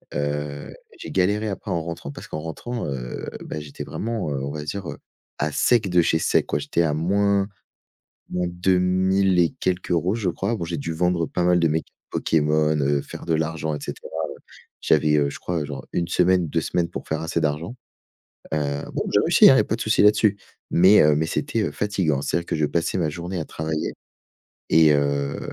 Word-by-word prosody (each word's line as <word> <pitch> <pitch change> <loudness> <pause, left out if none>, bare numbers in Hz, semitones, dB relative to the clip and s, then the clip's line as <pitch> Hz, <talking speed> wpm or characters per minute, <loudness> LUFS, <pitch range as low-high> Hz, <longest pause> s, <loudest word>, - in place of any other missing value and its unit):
Heu, 75 0 -3 0.2
j'ai - - -8
galéré 105 +3 +1
après 100 - -6
en 85 -2 -1
rentrant 85 -3 -6
parce - - -10
qu'en 75 - -5
rentrant, 115 +10 -5
heu, 65 -3 -5 0.2
beh, 75 - -5
j'étais 75 -2 -8
vraiment, 110 -8 -3
heu, 70 -1 -2
on 70 - -3
va 75 0 -5
dire, 95 +4 -5
heu, - - -7 0.4
à 75 +1 -1
sec 115 +1 +2
de 90 -1 +4
chez 80 -1 +2
sec - - +2
quoi, - - 0
j'étais 75 +4 0
à 80 -3 +1
moins 100 +4 +2 0.8
moins 90 0 -1
deux 90 +1 +1
mille 95 +1 +2
et 85 -2 +4
quelques 90 -1 -1
euros 85 +5 +1
je 105 -6 -1
crois. 100 +7 -2
Bon, 85 - -4
j'ai 85 -1 -4
dû 80 +3 -4
vendre 85 0 +1
pas 90 - -2
mal 90 0 +4
de 85 - +3
mes 80 +1 0
cartes - - -31 0.2
Pokémon, 75 0 +1
heu, 70 +1 +2
faire - - -9
de 80 - 0
l'argent 80 0 -1
et 75 - -5
cetera. - - -7 0.7
J'avais, 75 0 +3
heu, 70 -1 +2
je - - -8
crois 85 -3 -2
genre 70 -2 -6
1 85 - 0
semaine, 90 0 +3
2 80 +2 0
semaines 85 +1 -1
pour 90 - -8
faire 80 0 -2
assez 80 0 -1
d'argent. 80 +8 -2 0.8
Heu, 70 -2 -1
bon - - -2
j'ai - - +5
réussi - - +4
hein, - - +7
il - - +4
y - - +6
a - - +2
pas - - -1
de - - -13
souci - - +3
là-dessus 105 0 +4 0.3
mais 95 +5 +6
heu, 75 0 +5
mais 80 - +1
c'était, 115 - -1
heu, - - -1
fatiguant. 95 -9 0
C'est-à-dire 85 +3 -1
que - - -1
je 75 - +1
passais 85 +5 -1
ma 80 - +1
journée 90 +3 -5
à - - -3
travailler 80 0 -3 0.8
et 80 -1 +6
heu 70 -1 0
85 Hz, 215 wpm, -23 LUFS, 75-90 Hz, 0.8 s, hein